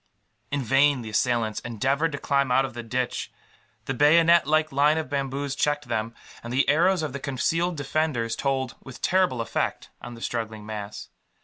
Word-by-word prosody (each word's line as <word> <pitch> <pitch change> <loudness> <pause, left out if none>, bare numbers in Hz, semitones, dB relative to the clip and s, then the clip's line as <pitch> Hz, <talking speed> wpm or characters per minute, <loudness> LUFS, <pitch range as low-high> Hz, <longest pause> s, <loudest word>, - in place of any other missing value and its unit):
In 140 -1 -1
vain 135 +1 +3
the 110 - -7
assailants 115 -1 0
endeavoured 135 +8 0
to - - -2
climb 140 -2 0
out 135 +2 +4
of 135 - -7
the 120 - -5
ditch. 120 +2 -3 0.5
The 135 - -2
bayonet 165 +4 +5
like 155 0 +2
line 145 +3 +3
of 155 -4 -4
bamboos 140 0 -2
checked 145 -2 -1
them; 115 0 -2 0.3
and 120 - -7
the 130 +3 +2
arrows 170 +4 +3
of 150 -4 -3
the 140 - -4
concealed 165 +6 -1
defenders 140 -5 -1
told, 130 -1 -1
with 130 -1 -12
terrible 180 -10 +2
effect, 115 - -3
on 120 0 -8
the 115 - -13
struggling 110 -3 -4
mass. 105 -1 -7
135 Hz, 180 wpm, -25 LUFS, 120-150 Hz, 0.5 s, bayonet